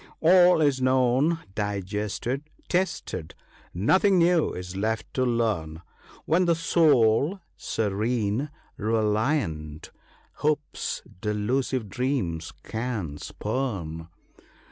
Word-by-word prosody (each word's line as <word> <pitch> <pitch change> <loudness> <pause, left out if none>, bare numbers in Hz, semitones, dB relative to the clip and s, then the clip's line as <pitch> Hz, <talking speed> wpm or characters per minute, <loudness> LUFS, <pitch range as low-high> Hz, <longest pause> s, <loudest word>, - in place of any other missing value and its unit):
" - - -27
All 180 0 +6
is 140 -3 +2
known, 130 +5 +2
digested, 105 +7 -3 0.2
tested; 175 - -2 0.4
nothing 185 - +3
new 170 -1 +4
is 90 +1 -7
left 110 +3 -2
to 130 - +1
learn 105 -10 -1 0.4
When 175 +4 +3
the 170 -1 +3
soul, 155 - +3 0.2
serene, 110 +4 -1 0.3
reliant, 105 - -1 0.5
Hope's 150 0 -2 0.2
delusive 110 +3 -1
dreams 95 - -2
can 110 -11 -4
spurn." 95 -10 -4
115 Hz, 90 wpm, -26 LUFS, 100-150 Hz, 0.5 s, All